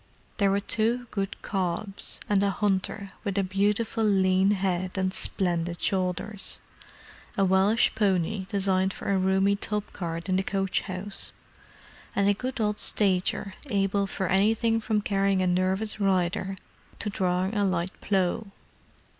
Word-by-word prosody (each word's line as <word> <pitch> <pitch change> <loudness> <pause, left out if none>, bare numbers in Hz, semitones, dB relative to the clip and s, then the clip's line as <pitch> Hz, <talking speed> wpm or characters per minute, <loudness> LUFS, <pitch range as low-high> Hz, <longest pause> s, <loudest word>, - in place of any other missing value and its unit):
There 200 -2 +3
were 200 +1 +2
two 230 +4 0
good 195 -1 -3
cobs, 195 +1 -2
and 200 -2 +3
a 200 - +2
hunter 200 0 -1
with 200 -3 -2
a 200 - +3
beautiful 205 +4 0
lean 190 -2 +3
head 185 -2 0
and 185 0 0
splendid 175 -3 -1
shoulders; 190 +2 -1 0.8
a 195 - +4
Welsh 190 +4 +4
pony 195 -2 0
designed 190 -2 +1
for - - -3
a 195 - +3
roomy 190 +1 +3
tub 210 0 -3
cart 170 -1 -4
in 185 -1 +2
the - - +2
coach 195 -1 0
house; 190 +2 -2 0.8
and 200 0 +2
a 205 - +5
good 250 +5 -4
old 210 -1 0
stager 195 0 +1 0.2
able 200 -1 +1
for 190 - -3
anything 225 +4 +2
from 215 -1 0
carrying 195 -2 +1
a - - +2
nervous 185 +4 0
rider 190 -1 +1 0.4
to 210 - -3
drawing 185 +1 0
a 205 - +2
light 185 -2 0
plough. 195 +2 0
195 Hz, 145 wpm, -27 LUFS, 185-205 Hz, 0.8 s, a